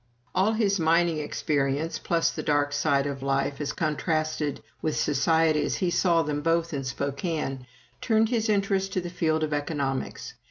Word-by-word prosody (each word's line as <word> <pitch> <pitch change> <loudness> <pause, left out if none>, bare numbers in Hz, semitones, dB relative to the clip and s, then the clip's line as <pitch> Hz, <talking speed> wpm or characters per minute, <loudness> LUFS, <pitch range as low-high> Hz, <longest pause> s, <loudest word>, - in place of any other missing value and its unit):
All 200 +4 +2
his 205 -3 +1
mining 165 0 +3
experience, 145 +1 -1
plus 170 -1 +1
the - - -5
dark 145 -1 +1
side 145 -1 +2
of 140 -1 -4
life, 135 +1 -1
as 145 - -1
contrasted 155 -2 -1 0.2
with 155 - -1
society 155 +1 +2
as - - -1
he 180 -2 0
saw 170 -2 +3
them 145 -1 -2
both 165 +1 +1
in 140 -1 -2
Spokane, 140 0 -3 0.3
turned 220 -1 +2
his 225 -2 0
interest 195 -2 +1
to 185 - 0
the 175 0 -6
field 160 -3 0
of 155 -1 -1
economics. 145 -2 -3
155 Hz, 165 wpm, -26 LUFS, 145-175 Hz, 0.3 s, mining